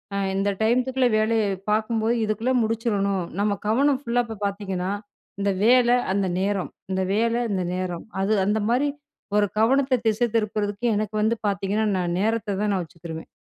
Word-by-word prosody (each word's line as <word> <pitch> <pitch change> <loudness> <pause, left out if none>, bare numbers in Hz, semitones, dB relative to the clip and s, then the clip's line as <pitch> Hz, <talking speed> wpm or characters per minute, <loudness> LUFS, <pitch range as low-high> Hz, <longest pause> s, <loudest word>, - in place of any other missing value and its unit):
அ - - 0 0.2
இந்த 195 +1 +1
டையத்துக்குள்ளே 250 +3 +2
வேலைய 220 0 +2 0.3
பாக்கும்போது, 220 +1 +1
இதுக்குள்ளே 220 +5 0
முடிச்சுறணும், 205 -4 0 0.2
நம்ம 205 -1 +1
கவனம் 270 +5 +3
ஃபுல்லா 245 -2 +1
இப்போ 225 -1 -7
பாத்தீங்கன்னா, 195 -2 -2 0.5
இந்த 200 0 +2
வேலை, 245 0 +5 0.2
அந்த 195 -1 +1
நேரம். 195 0 -1 0.2
இந்த 190 0 0
வேலை, 230 +3 +1
இந்த 185 -2 0
நேரம். 180 -2 -4 0.2
அது 200 +3 +2
அந்த 210 +2 +1
மாரி, 260 +5 +2 0.5
ஒரு 210 - +4
கவனத்தை 260 +4 +3
திசை 220 +2 +2
திருப்புறதுக்கு 210 0 -1
எனக்கு 215 0 -2
வந்து 220 +2 +2
பாத்தீங்கன்னா 200 +2 0
"நான் 175 -1 -1
நேரத்தை 220 0 0
தான் 210 0 +1
நான் 190 - 0
வச்சுக்குருவேன்." 165 -1 -9
215 Hz, 155 wpm, -24 LUFS, 200-235 Hz, 0.5 s, வேலை